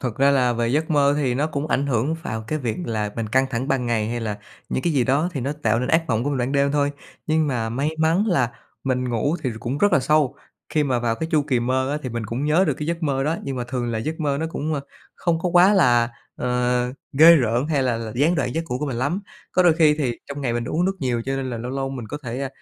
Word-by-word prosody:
Thật 125 -4 -3
ra 140 +1 +4
là 125 -3 +3
về 120 0 0
giấc 155 +6 0
mơ 145 -1 +4
thì 130 -4 0
nó 145 +4 +1
cũng 145 -1 -3
ảnh 145 -2 0
hưởng 135 +4 0
vào 110 0 -4
cái 155 - -1
việc 120 -5 -2
là 105 -2 -2
mình 115 -2 -2
căng 130 +4 +2
thẳng 130 +2 -2
ban 130 -4 0
ngày, 110 -2 0
hay 120 0 -3
là 105 -2 -3 0.3
những 130 - -2
cái 170 - +1
gì 130 -4 +2
đó 145 +8 +2
thì 140 - -3
nó 140 +4 -1
tạo 115 0 +2
nên 125 - -2
ác 165 +3 +3
mộng 115 +2 +1
của 145 - 0
mình 140 - -1
ban 125 +2 -1
đêm 140 0 +2
thôi. 145 -1 +2 0.4
Nhưng 155 0 +2
mà 120 -5 -1
may 135 +7 -1
mắn 165 +7 +2
là 130 - +2 0.3
mình 125 -1 0
ngủ 120 +7 0
thì 130 - -1
cũng 130 +5 -3
rất 205 0 +3
là - - +6
sâu, 145 0 +2 0.3
khi 150 -1 +1
mà 130 -3 +1
vào 120 -1 0
cái 160 +7 -4
chu 150 -2 +4
kỳ 130 -4 0
mơ 130 +2 0
á 150 - -1
thì 130 - -3
mình 115 -2 -4
cũng 120 +6 -3
nhớ 155 +5 +3
được - - +1
cái 150 - -5
giấc 170 0 -2
mơ 135 -3 0
đó, 160 +2 0
nhưng 135 -1 -4
mà 125 - -2
thường 120 -2 -2
là 110 - -1
giấc 155 +9 -4
mơ 145 -3 0
nó 160 - -1
cũng, 155 0 -2
ơ, 140 - -2 0.3
không 170 -2 0
có 180 - -1
quá 180 +3 +6
là, 120 -9 +4 0.3
ờ, 125 0 0 0.2
ghê 160 +4 +8
rợn 120 0 +1
hay 145 -4 +1
là 125 -3 +1
là 115 -1 -5
gián 150 +8 +3
đoạn 140 -6 -1
giấc 165 - -1
ngủ 125 - -1
của 150 - -2
mình 130 - -3
lắm. 145 +10 -1 0.3
Có 185 - +4
đôi 175 -2 +6
khi 155 -2 +5
thì 125 -6 -1
trong 140 0 -5
ngày 130 -4 -1
mình 120 0 -2
uống 165 +8 0
nước 195 +1 0
nhiều 120 -3 -1
cho 135 0 -2
nên 130 -1 -3
là 120 - -4
lâu 120 +2 -5
lâu 135 0 -2
mình 125 -4 -6
có 145 - -4
thể, 120 +2 -4
a, 135 - -2
135 Hz, 295 wpm, -23 LUFS, 120-150 Hz, 0.4 s, ghê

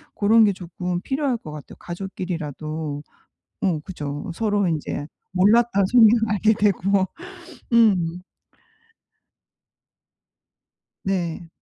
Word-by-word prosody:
고런 220 +2 +5
게 200 - +2
조금 180 0 -4
필요할 265 +1 -1
것 155 - -10
같아요, 150 -1 -10
가족끼리라도. 160 -5 -5 0.6
어 175 -5 +1
그죠. 150 -3 -6
서로 205 -3 +1
인제 150 -2 -3 0.3
몰랐던 200 +1 +4
성향 225 -1 +7 0.2
알게 210 +1 +3
되고. 195 -2 +2 0.7
음. 180 -7 +3 2.8
네. 175 -3 -2
185 Hz, 185 characters per minute, -23 LUFS, 165-210 Hz, 2.8 s, 성향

